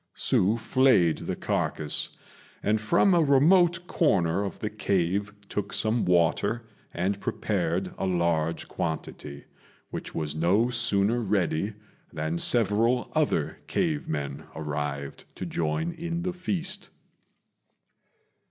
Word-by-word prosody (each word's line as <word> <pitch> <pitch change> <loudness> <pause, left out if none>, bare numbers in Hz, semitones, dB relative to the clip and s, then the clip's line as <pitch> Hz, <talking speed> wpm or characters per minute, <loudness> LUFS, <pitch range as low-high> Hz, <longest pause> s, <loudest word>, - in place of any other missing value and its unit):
Hsü 105 +5 +2
flayed 115 -8 +3
the - - -1
carcase, 75 -2 -1 0.5
and 105 +1 +1
from 170 - +4
a 170 - +5
remote 170 +5 +4
corner 95 - +2
of 100 - -4
the 105 - -4
cave 100 -1 0 0.2
took 100 -1 -3
some 110 +2 +1
water 90 +6 +2 0.3
and 95 +3 -1
prepared 90 -2 -1
a 95 - 0
large 85 -2 0
quantity, 75 -3 -5 0.5
which - - -6
was 75 -2 -2
no 95 +10 +2
sooner 110 -1 +2
ready 100 -2 0 0.4
than 80 +2 -2
several 115 +3 +2
other 155 -2 0
cave 160 -5 -1
men 70 -3 -4
arrived 75 -2 -4
to - - -5
join 85 - -1
in 170 0 -4
the 180 0 -2
feast. 185 +1 -4
100 Hz, 115 wpm, -27 LUFS, 85-130 Hz, 0.5 s, a